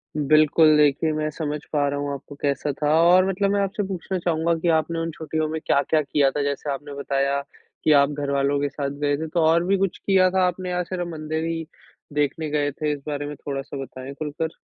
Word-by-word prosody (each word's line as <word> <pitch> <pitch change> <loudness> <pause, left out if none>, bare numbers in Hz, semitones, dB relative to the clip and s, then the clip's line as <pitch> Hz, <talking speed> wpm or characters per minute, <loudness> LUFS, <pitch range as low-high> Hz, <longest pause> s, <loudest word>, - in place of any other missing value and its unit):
बिल्कुल, 155 +1 +5
देखिए 150 +2 +3
मैं 155 0 -1
समझ 150 -1 -4
पा 145 -1 +2
रहा 145 0 -2
हूँ 145 0 -2
आपको 140 +1 -9
कैसा 145 +1 0
था 150 0 +3
और 180 +2 +6
मतलब 195 +1 +1
मैं 205 - +1
आपसे 200 +1 -1
पूछना 190 0 -3
चाहूँगा 170 -1 +1
कि 175 - -2
आपने 165 +1 -2
उन 165 0 -2
छुट्टियों 155 0 -2
में 160 0 -3
क्या-क्या 155 +2 +2
किया 140 -1 +2
था, 145 - -2
जैसे 140 +1 -2
आपने 145 +1 -6
बताया 140 0 0 0.4
कि 155 - +4
आप 140 -1 +5
घरवालों 140 -1 0
के 145 0 0
साथ 140 0 -3
गए 145 -1 +1
थे। 160 +2 -4
तो 165 +2 -1
और 165 +2 +4
भी 195 +2 +2
कुछ 195 -1 -1
किया 190 -2 +3
था 190 0 +3
आपने 180 +1 -3
या 180 0 0
सिर्फ 175 0 -4
मंदिर 160 -1 -4
ही 165 0 -3 0.5
देखने 150 +2 -1
गए 145 -1 0
थे? 150 +2 -2
इस 145 - -6
बारे 145 -1 -3
में 145 - -6
थोड़ा-सा 140 0 -5
बताएँ 130 +1 -9
खुलकर। 155 +2 -4
155 Hz, 220 wpm, -23 LUFS, 145-165 Hz, 0.5 s, और